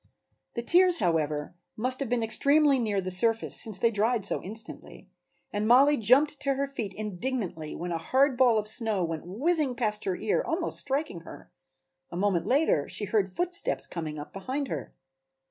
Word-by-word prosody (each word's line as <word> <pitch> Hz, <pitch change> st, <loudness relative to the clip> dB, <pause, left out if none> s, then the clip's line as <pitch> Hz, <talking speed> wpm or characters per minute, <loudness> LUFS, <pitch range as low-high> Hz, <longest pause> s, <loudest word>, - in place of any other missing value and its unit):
The 235 Hz, -, -3 dB
tears, 360 Hz, +5 st, +5 dB
however, 155 Hz, -5 st, -1 dB, 0.2 s
must 255 Hz, +4 st, +1 dB
have 275 Hz, -4 st, -3 dB
been 240 Hz, -1 st, 0 dB
extremely 280 Hz, +4 st, +3 dB
near 210 Hz, -4 st, -1 dB
the 185 Hz, 0 st, -4 dB
surface, 225 Hz, +5 st, +2 dB
since 215 Hz, -4 st, +2 dB
they 230 Hz, +3 st, +2 dB
dried 220 Hz, 0 st, 0 dB
so -, -, +1 dB
instantly, 215 Hz, +3 st, -7 dB, 0.4 s
and 210 Hz, +1 st, -1 dB
Mollie 275 Hz, +5 st, +6 dB
jumped 275 Hz, +7 st, +3 dB
to 275 Hz, -1 st, -1 dB
her 280 Hz, +1 st, -1 dB
feet 240 Hz, -8 st, -5 dB
indignantly 205 Hz, -6 st, -4 dB
when 175 Hz, +1 st, -5 dB
a 165 Hz, -, -2 dB
hard 265 Hz, -, +2 dB
ball 245 Hz, -3 st, +4 dB
of 210 Hz, 0 st, -1 dB
snow 220 Hz, -3 st, 0 dB
went 165 Hz, 0 st, -5 dB
whizzing 280 Hz, -, -1 dB
past 215 Hz, -3 st, -1 dB
her 190 Hz, -, -1 dB
ear, 215 Hz, +2 st, 0 dB
almost 330 Hz, +1 st, -1 dB
striking 275 Hz, -, -2 dB
her. 165 Hz, -, -13 dB, 0.6 s
A 170 Hz, -, -7 dB
moment 190 Hz, -3 st, 0 dB
later 265 Hz, -, +1 dB
she 210 Hz, -, 0 dB
heard 200 Hz, -1 st, 0 dB
footsteps 355 Hz, -, -1 dB
coming 155 Hz, -3 st, -6 dB
up 145 Hz, -, -9 dB
behind 260 Hz, +8 st, -4 dB
her. 140 Hz, -8 st, -5 dB
225 Hz, 180 wpm, -27 LUFS, 185-270 Hz, 0.6 s, Mollie